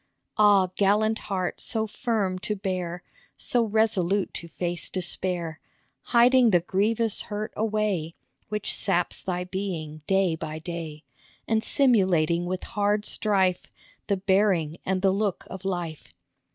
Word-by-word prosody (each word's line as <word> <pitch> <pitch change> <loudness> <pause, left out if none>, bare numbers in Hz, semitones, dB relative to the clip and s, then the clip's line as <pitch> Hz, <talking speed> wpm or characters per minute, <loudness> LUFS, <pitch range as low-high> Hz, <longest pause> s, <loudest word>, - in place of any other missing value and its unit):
Ah, 200 -3 +5
gallant 210 +2 +2
heart, 185 -2 -2
so 220 -2 0
firm 210 -4 -1
to 210 +3 -3
bear, 180 -3 -3 0.3
So 240 -1 +1
resolute 205 -3 +1
to 170 - -6
face 175 +1 -4
despair, 175 -3 -2 0.5
Hiding 245 0 +5
the 175 -4 +4
grievous 210 +5 0
hurt 210 +1 -5
away 210 -7 -1 0.3
Which 210 -1 -2
saps 180 -3 0
thy 180 -1 -2
being 180 -5 -5
day 190 -3 +2
by 155 -1 -6
day, 160 -2 -6 0.4
And 220 0 +1
simulating 180 - +3
with 185 0 -3
hard 205 +1 0
strife 190 -4 0 0.4
The 200 - +1
bearing 190 -5 +1
and 190 0 0
the 195 - +5
look 200 -1 -1
of 190 +1 -8
life. 175 -5 -4
190 Hz, 130 wpm, -26 LUFS, 175-210 Hz, 0.5 s, Ah